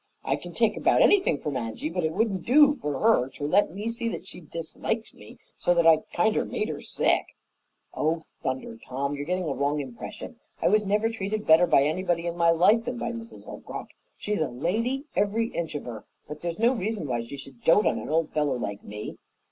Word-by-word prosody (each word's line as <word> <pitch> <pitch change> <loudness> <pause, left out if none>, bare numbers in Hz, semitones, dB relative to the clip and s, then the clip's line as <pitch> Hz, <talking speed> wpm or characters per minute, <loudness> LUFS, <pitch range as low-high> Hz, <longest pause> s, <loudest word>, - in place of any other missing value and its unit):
I - - +1
can - - -9
take - - +2
about - - +4
anything 380 - +4
from 145 -1 -4
Angy, 115 +3 -3
but 175 +2 -2
it 160 - +1
wouldn't 195 -1 0
do 290 +3 +6
for 145 -2 -2
her 215 - +4
to - - -6
let 180 +6 +3
me 210 +3 -4
see 230 0 -2
that - - -4
she - - -11
disliked - - -4
me - - -14 0.2
so 175 - +2
that 170 -1 +3
I 165 -1 +8
kinder 215 +5 +2
made - - -3
her - - -5
sick." - - +1 0.7
"Oh, 160 +1 0 0.2
thunder, 130 -5 -4
Tom! 140 +2 -3
You're 145 0 -5
getting 180 -1 -1
a 140 - 0
wrong 140 +3 0
impression. 130 -4 -7 0.2
I - - +3
was 210 +1 +3
never 210 +3 +2
treated 215 -1 -3
better 160 +3 +6
by 140 - +5
anybody 170 +2 0
in 170 0 -2
my 170 -1 +3
life 205 +8 +4
than 245 0 -3
by 235 - -2
Mrs. 230 0 -9
Holcroft. - - -8 0.2
She's 210 -4 -2
a 155 - +2
lady, 220 - -1
every 215 +3 +1
inch 165 -3 -4
of 145 - -3
her. 115 -4 -7 0.2
But 150 0 -8
there's 170 -1 -3
no 235 +3 +4
reason 220 -4 -2
why 120 -2 -1
she 115 +5 -8
should 135 -3 -12
dote 190 +6 +5
on - - +2
an - - -7
old 160 0 +1
fellow 150 -3 +1
like 100 -4 -5
me." 105 +1 -7
170 Hz, 220 wpm, -26 LUFS, 145-215 Hz, 0.7 s, I